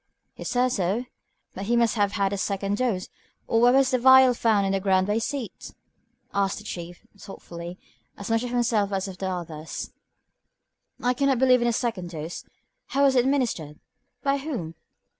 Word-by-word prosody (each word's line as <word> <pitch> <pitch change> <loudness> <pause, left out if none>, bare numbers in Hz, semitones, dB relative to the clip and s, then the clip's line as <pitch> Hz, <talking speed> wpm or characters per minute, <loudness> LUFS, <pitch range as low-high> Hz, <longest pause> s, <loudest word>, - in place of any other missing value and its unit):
"He - - -9
says 250 0 +1
so. 195 +7 0 0.5
But 195 - -6
he 235 +3 +1
must 235 -2 +3
have 205 -2 +1
had 200 -2 0
a - - -2
second 200 +1 -1
dose, 225 -7 -1 0.4
or 225 - +1
why 240 - +7
was 265 +1 +4
the 255 - +2
vial 260 0 +7
found 220 -4 +2
on 195 - 0
the 195 - +1
ground 190 -1 +2
by 205 - 0
his 225 +1 0
seat?" 275 -6 -6 0.6
asked 200 -1 0
the 210 - -9
Chief, 175 -1 -8
thoughtfully, 175 -2 -9 0.4
as 200 - -7
much 225 0 +1
of 245 - -4
himself 230 -4 +1
as 195 0 -1
of 185 -1 -9
the 190 - -2
others. 165 -4 -6 1.1
"I 250 0 +3
cannot 270 0 +2
believe 255 0 +4
in 240 - +2
a - - +3
second 225 -7 -2
dose. 160 0 -6 0.4
How 280 +1 +1
was 270 -1 +4
it 250 -1 +4
administered 235 - -1 0.4
by 280 -1 +1
whom? 250 - -5
215 Hz, 190 wpm, -25 LUFS, 190-250 Hz, 1.1 s, why